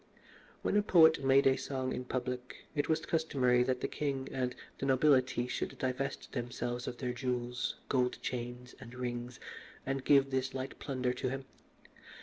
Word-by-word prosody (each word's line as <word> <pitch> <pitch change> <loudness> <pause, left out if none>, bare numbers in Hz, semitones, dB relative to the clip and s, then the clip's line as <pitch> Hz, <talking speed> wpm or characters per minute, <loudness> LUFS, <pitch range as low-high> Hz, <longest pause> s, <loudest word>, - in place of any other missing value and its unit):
When - - +1
a - - +5
poet 160 -7 +6
made 135 +1 +5
a 135 -1 +6
song 130 -1 -3
in 125 - -4
public, 125 0 -4
it 145 0 0
was 160 0 +1
customary 130 -7 +2
that 125 0 +1
the - - 0
king 135 -2 -2
and 125 -1 -1 0.2
the 135 - -1
nobility 130 -2 +4
should - - -3
divest 130 +2 -2
themselves 120 0 -3
of 120 - -4
their 125 -1 -2
jewels, 125 0 -2
gold 125 -2 +1
chains, 125 0 -5
and 125 -1 -10
rings, 120 0 -4 0.5
and 135 0 -1
give 135 0 +5
this 130 0 -1
light 130 +1 -5
plunder 130 -3 -1
to 125 0 -2
him. 135 +1 -4
130 Hz, 165 wpm, -33 LUFS, 125-135 Hz, 0.5 s, poet